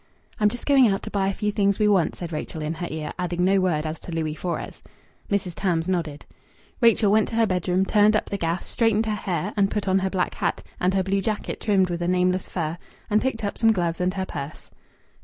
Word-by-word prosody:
"I'm 210 -1 +4
just 245 +3 -7
going 275 -4 +6
out 195 -2 0
to - - -6
buy 195 -2 +1
a 195 - 0
few 210 -1 -1
things 200 -1 +1
we 210 - +3
want," 195 -5 +2
said 175 -1 -6
Rachel 155 +1 -4
in 155 +1 -2
her 175 +1 -5
ear, 155 -1 -5
adding 180 0 0
no 195 +1 +4
word 165 -5 0
as 155 0 -4
to - - -9
Louis 160 -2 -2
Fores. 170 +2 -5 0.5
Mrs. 200 -3 -1
Tams 170 -2 -1
nodded. 165 -6 -2 0.6
Rachel 230 -3 +5
went 215 0 +4
to - - -5
her 230 0 +4
bedroom, 185 -1 +1
turned 210 +1 +4
up - - 0
the 200 - -1
gas, 170 +1 -1
straightened 225 -1 +1
her 220 - -1
hair, 185 -1 -2
and 200 -2 +3
put 205 -1 -3
on 190 0 +3
her 190 0 -1
black 185 -1 -1
hat, - - -2 0.2
and 185 +2 +1
her 190 - +2
blue 195 +1 0
jacket 215 +2 -3
trimmed 190 -4 +2
with 170 0 -3
a 175 - 0
nameless 180 +1 +1
fur, 165 -1 -3 0.3
and 210 +1 +4
picked 255 -4 -2
up 200 - -3
some 225 -1 +5
gloves 175 -4 -1
and 180 +1 0
her 190 -1 -2
purse. 145 -3 -7
190 Hz, 240 wpm, -24 LUFS, 175-210 Hz, 0.6 s, going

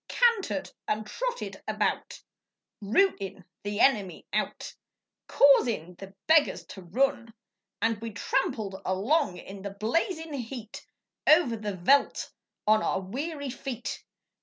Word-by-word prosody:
Cantered 465 -5 +2 0.2
and 215 0 -1
trotted - - -4
about, - - -1 0.6
Routin' 200 - +1 0.2
the 205 +1 -3
enemy 210 -9 +2
out, - - -2 0.5
Causin' 235 - +4
the 195 0 -10
beggars 320 -2 +4
to 190 - -9
run! 235 +5 0 0.5
And 225 -2 +1
we 230 - -4
tramped 225 +6 0 0.3
along 205 - +1
in 195 +2 -9
the 200 - -4
blazin' 315 - -1
heat, 240 -4 -6 0.4
Over 305 -7 +6
the 210 -2 -4
veldt 275 +11 +3 0.3
on 215 0 +5
our - - 0
weary 280 - -4
feet. 255 -2 -5
230 Hz, 115 wpm, -28 LUFS, 200-285 Hz, 0.6 s, Over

